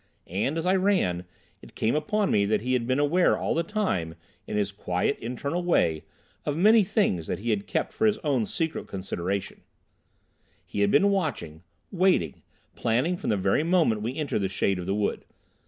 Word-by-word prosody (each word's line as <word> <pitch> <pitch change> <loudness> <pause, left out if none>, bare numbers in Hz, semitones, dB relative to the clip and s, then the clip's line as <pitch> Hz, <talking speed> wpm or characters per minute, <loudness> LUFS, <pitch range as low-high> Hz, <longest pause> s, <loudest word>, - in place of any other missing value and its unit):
And, 105 - -2
as 165 - -2
I 185 - +3
ran, 185 - +1 0.4
it - - -15
came 110 - +1
upon 200 +7 0
me 100 - +3
that 105 0 +1
he 125 +3 -1
had 120 -2 0
been 130 +1 +1
aware 150 +5 +3
all - - -1
the 165 - +1
time, 165 - -2 0.3
in 105 - -2
his 100 -1 0
quiet, 95 +5 -1
internal 140 +8 -3
way, 85 - +1 0.4
of 145 0 -2
many 215 +5 +6
things 140 - 0
that - - -2
he 115 +3 -2
had 105 -2 -1
kept - - -2
for 220 - +2
his 215 0 +2
own 130 -8 +1
secret 160 -1 -3
consideration; 95 0 -4 1.0
he 100 - -3
had 100 - +3
been 195 - +4
watching, 145 - -2 0.3
waiting, 180 - +1 0.3
planning 125 +10 +1
from - - -4
the 105 - +2
very 95 +8 +2
moment 160 - +2
we 120 +5 -3
entered 150 -7 -1
the 95 - +1
shade 95 0 0
of 90 - -6
the 95 - 0
wood. 105 -1 -1
125 Hz, 190 wpm, -26 LUFS, -, 1.0 s, many